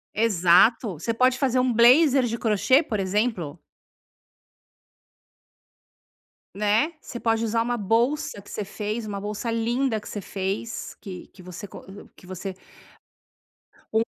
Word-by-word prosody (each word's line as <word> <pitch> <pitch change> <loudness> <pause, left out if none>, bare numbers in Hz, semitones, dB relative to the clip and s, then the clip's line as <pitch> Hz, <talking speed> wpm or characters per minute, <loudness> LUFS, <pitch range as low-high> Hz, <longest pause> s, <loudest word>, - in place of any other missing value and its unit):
Exato. 200 - +3
Você 230 - -2
pode 255 +2 +2
fazer 255 -2 +2
um 250 -1 +2
blazer 260 +4 +6
de 230 0 -2
crochê, 225 - +3
por 215 -7 -3
exemplo. 195 -5 -1 3.0
Né. 210 +10 +1
Você 240 - -8
pode 225 0 +1
usar 230 0 +1
uma 240 +1 -1
bolsa 230 +5 0
que 200 - -15
você 210 - -4
fez, 215 +2 -4
uma 200 -1 -4
bolsa 210 +3 -4
linda 230 +1 0
que - - -13
você 205 - -5
fez, 195 +4 -4
que 190 -3 -8
que 190 - -15
você 180 +2 -9
co - - -11 0.3
que 180 - -17
você 190 +1 -6 1.4
um 220 0 +3
225 Hz, 135 wpm, -24 LUFS, 200-240 Hz, 3.0 s, blazer